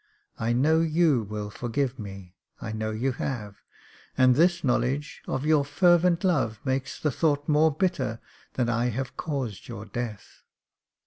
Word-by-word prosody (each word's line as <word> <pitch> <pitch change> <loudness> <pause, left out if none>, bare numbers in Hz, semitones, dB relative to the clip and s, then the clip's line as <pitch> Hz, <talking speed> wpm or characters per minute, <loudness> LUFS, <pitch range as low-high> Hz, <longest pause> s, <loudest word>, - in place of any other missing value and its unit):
I 115 +1 0
know 150 +7 +3
you 160 -5 +3
will 105 0 -5
forgive 125 +3 -2
me 95 -3 -9
— - - -42
I 110 - -5
know 110 0 -3
you 115 +5 -1
have 110 -5 -4 0.3
— - - -26
and 130 -1 +6
this 175 +5 +3
knowledge 130 +3 0
of 130 +2 -2
your 155 -2 +4
fervent 175 +4 +3
love 130 - +1
makes 130 0 -2
the 150 - 0
thought 145 0 0
more 155 +1 +4
bitter 145 - -1 0.4
that 125 -2 +1
I 120 0 +1
have 125 +2 -3
caused 135 - -4
your 100 - -7
death. 110 -1 -6
130 Hz, 165 wpm, -26 LUFS, 115-155 Hz, 0.4 s, and